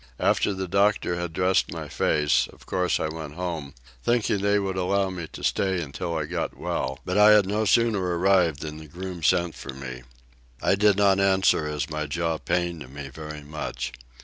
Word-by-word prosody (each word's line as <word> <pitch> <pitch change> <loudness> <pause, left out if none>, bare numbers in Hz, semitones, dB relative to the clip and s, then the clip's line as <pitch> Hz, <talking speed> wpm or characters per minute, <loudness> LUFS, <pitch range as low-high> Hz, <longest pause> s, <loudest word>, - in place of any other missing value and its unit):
After - - +2
the 95 0 -3
doctor 100 -1 +2
had 85 -1 -3
dressed 90 +3 +1
my - - -5
face, 75 -2 +2
of - - -18
course 90 -1 0
I - - 0
went 80 -2 -7
home, 85 -6 -4 0.3
thinking 120 -4 +1
they 100 +1 +2
would 95 -2 -1
allow 95 +1 +1
me 90 -3 -5
to - - -9
stay 95 -2 +1
until 85 +2 -4
I 75 - -1
got 85 +2 -3
well, 65 +1 -2
but 95 +3 0
I 105 +1 +8
had 105 -2 +5
no 105 +3 0
sooner 115 0 +3
arrived 90 -3 +2
than 75 0 -6
the 80 0 -10
groom 90 +3 -7
sent 85 0 +2
for 65 - -8
me; 65 -2 -7 0.6
I - - +2
did 100 0 +4
not 100 -1 +4
answer, 95 -5 +3
as 75 -1 -2
my 75 -1 -3
jaw 80 +1 -1
pained 85 -6 -2
me 70 0 -7
very 75 +1 -8
much. 75 +1 -5
85 Hz, 195 wpm, -25 LUFS, 75-95 Hz, 0.6 s, I